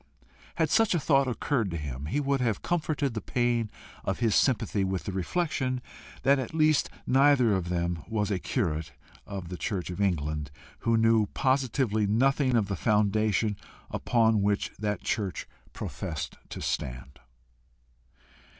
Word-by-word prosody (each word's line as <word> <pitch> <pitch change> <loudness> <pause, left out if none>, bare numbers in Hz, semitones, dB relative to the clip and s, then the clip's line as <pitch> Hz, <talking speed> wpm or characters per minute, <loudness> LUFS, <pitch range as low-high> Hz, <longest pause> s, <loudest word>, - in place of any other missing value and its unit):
Had - - +1
such 225 -5 +4
a - - +2
thought 140 -2 +3
occurred 125 -3 0
to 85 - -3
him, 70 -2 -5
he 145 - 0
would 140 -2 0
have 115 -5 0
comforted 155 -6 0
the 110 - -3
pain 120 -3 0 0.3
of - - -1
his 115 -3 +1
sympathy 105 -4 +2
with 95 -1 -1
the - - -4
reflection 130 - -1 0.4
that 140 0 +4
at 130 +4 -5
least 155 -2 +3 0.2
neither 130 -4 +4
of 90 -3 -1
them 85 -1 -1
was 105 -2 -1
a 95 - 0
curate 80 - -2 0.3
of 95 -4 -6
the 90 - -5
church 90 -1 -3
of 90 - -4
England 75 -6 0 0.3
who 115 -1 +2
knew 115 -1 +4
positively 130 -5 +1
nothing 130 +4 +2
of 110 -4 +2
the 100 - -2
foundation 105 +1 +2 0.4
upon 110 -3 +2
which 100 0 0
that 105 -1 -2
church 100 -4 -2 0.2
professed 75 -3 -5
to - - -7
stand. 65 +2 -4
110 Hz, 150 wpm, -28 LUFS, 95-130 Hz, 0.4 s, such